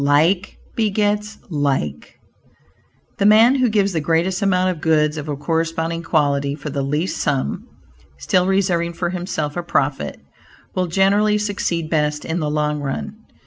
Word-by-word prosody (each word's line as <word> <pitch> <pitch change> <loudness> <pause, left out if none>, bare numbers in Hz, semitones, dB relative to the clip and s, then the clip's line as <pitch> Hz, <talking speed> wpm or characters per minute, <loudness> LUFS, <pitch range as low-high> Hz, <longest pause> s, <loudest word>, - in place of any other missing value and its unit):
"Like 160 +7 +2 0.2
begets 210 0 0
like." 135 - -2 1.0
The 200 - +2
man 225 +4 +7
who 255 -3 +2
gives 200 -2 +1
the 165 - 0
greatest 170 +5 0
amount 185 -2 +2
of 165 -4 -7
goods 155 -1 +2
of 150 -1 -6
a 145 - -2
corresponding 165 +2 -1
quality 145 -4 +1
for 150 0 -7
the 140 0 -2
least 150 +6 -1
sum 140 -3 -1 0.5
(still 180 - +1
reserving 180 -3 +1
for 175 +1 -2
himself 175 -5 -3
a 175 - -1
profit) 140 - -1 0.5
will 185 -1 0
generally 200 +4 +3
succeed 195 -6 -2
best 150 -2 0
in 165 +2 -2
the 150 -2 -1
long 150 0 0
run. 145 +9 -4
165 Hz, 150 wpm, -20 LUFS, 150-195 Hz, 1.0 s, man